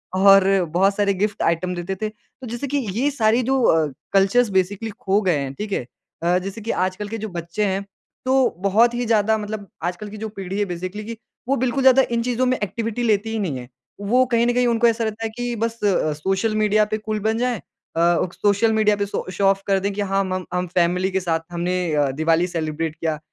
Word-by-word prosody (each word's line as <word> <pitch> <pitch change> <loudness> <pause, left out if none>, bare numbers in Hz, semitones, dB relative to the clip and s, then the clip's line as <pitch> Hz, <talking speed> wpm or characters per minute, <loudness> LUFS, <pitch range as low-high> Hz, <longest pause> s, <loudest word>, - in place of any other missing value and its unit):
और 195 0 +5 0.2
बहुत 195 +1 +3
सारे 200 -1 +2
गिफ़्ट 205 +2 -2
आइटम 175 +2 0
देते 175 +2 -4
थे। 215 - -1
तो 250 +4 -15
जैसे 240 +5 -4
कि 285 +2 -1 0.2
ये 285 +3 +2
सारी 230 -1 +2
जो 265 +1 +1
अ, 160 -7 +4 0.3
कल्चर्स 200 +4 +4
बेसिकली 200 +4 -1
खो 195 +2 +1
गए 180 -6 +2
हैं। 135 -1 -3
ठीक 210 +6 -6
है? 125 - -1 0.4
अ, 175 +1 +3
जैसे 195 +4 -6
कि 230 - -2 0.2
आजकल 190 +2 -6
के 225 - -4
जो 220 0 -5
बच्चे 175 +4 -3
हैं, 195 +1 -1 0.4
तो 260 0 +3
बहुत 220 +5 +3
ही 240 0 -2
ज़्यादा 220 -1 +2
मतलब 210 -1 -5 0.2
आजकल 180 +4 -3
की 215 - -9
जो 220 +1 -5
पीढ़ी 195 -1 -5
है 205 - +2
बेसिकली 185 +4 -5
कि 230 0 -6 0.3
वो 275 - +2
बिल्कुल 260 +1 0
ज़्यादा 265 0 +7
इन 235 0 +1
चीज़ों 250 +1 0
में 255 0 +1
एक्टिविटी 230 +3 -3
लेती 220 -1 +1
ही 225 - -2
नहीं 165 -10 -2
है। 125 - -9 0.4
वो 255 +1 +5
कहीं 235 0 +3
न 245 - +2
कहीं 245 0 +2
उनको 235 0 +3
ऐसा 230 0 +1
रहता 220 0 -3
है - - -1
कि 245 -1 -2
बस 230 +1 -2
अ, 180 -6 +2
सोशल 195 +8 -1
मीडिया 215 0 +3
पे - - +2
कूल 215 0 -3
बन 220 +1 +1
जाएँ। 245 -1 0
अ, - - -17 0.4
क 170 +1 +3
सोशल 210 +2 +2
मीडिया 215 -1 +3
पे 200 0 -1
सो 200 - -4
शो 195 +2 -1
ऑफ़ 195 0 +3
कर 195 -1 +3
दें 200 +1 -1
कि 205 - -3
हाँ, 195 0 +1
मम 185 -1 -3
हम 180 0 -1
फ़ैमिली 180 +2 +1
के 190 - +1
साथ 165 -3 0
हमने 175 0 -1
अ, 145 -2 +2
दिवाली 160 +4 +1
सेलिब्रेट 160 -2 -3
किया, 160 -1 -2
205 Hz, 235 wpm, -22 LUFS, 180-225 Hz, 0.4 s, ज़्यादा